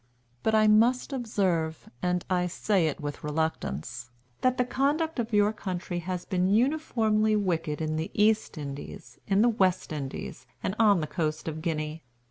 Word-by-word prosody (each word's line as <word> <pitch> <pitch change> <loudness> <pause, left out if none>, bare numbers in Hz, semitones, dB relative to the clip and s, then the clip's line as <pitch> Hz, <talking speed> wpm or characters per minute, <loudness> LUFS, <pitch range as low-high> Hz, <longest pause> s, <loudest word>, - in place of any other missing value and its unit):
But 220 - +2
I 215 0 +5
must 235 +6 +4
observe, 185 - -1
and 180 0 0
I 180 -1 +1
say 185 -1 +1
it 150 - -3
with 145 -1 -5
reluctance, 125 - -3 0.3
that 255 0 +2
the 250 - +2
conduct 290 +4 0
of 235 0 -2
your 210 0 +3
country 180 -3 -4
has 180 +1 -4
been 185 -1 +1
uniformly 220 -3 +2
wicked 165 -6 -1
in 155 0 -1
the 160 +4 -2
East 215 -3 +2
Indies, 140 -1 -8
in 200 +2 +4
the 240 - +5
West 190 -7 +1
Indies, 135 -3 -6 0.2
and 185 - -1
on 205 -6 +5
the - - -1
coast 155 0 -2
of 155 0 -4
Guinea. 155 -1 -3
185 Hz, 165 wpm, -28 LUFS, 160-220 Hz, 0.3 s, I